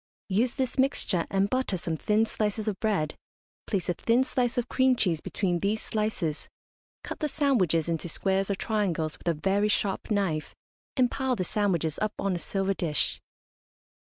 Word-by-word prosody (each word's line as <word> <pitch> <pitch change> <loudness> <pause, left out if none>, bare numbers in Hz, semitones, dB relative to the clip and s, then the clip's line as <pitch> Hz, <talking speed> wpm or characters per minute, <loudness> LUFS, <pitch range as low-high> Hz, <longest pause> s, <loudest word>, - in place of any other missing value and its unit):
Use 230 +6 +1
this 260 -1 -2
mixture 260 -10 +1
and 195 0 +2
butter 255 -4 0
some 165 -2 -2
thin 210 +7 +2
slices 215 0 -2
of 205 -3 -1
bread, 195 -9 0 0.5
place 195 -4 -1
a 175 - +2
thin 230 +8 +2
slice 250 -2 0
of 245 0 0
cream 260 0 +3
cheese 175 -9 +1
between 180 -4 -1
these 205 +4 0
slices, 210 -10 -2 0.5
cut - - -6
the 305 - 0
sandwiches 220 - +2
into 170 0 -2
squares 195 +3 +1
or 200 - +1
triangles 185 -8 -1
with - - -11
a 170 - +3
very 195 +6 +1
sharp 200 0 0
knife, 190 -8 0 0.4
and 250 -2 +4
pile 265 -2 0
the 190 - -1
sandwiches 175 -6 0
up 215 0 0
on 195 -1 0
a 175 - -2
silver 195 +2 0
dish. 165 -5 0
200 Hz, 175 wpm, -28 LUFS, 175-225 Hz, 0.5 s, and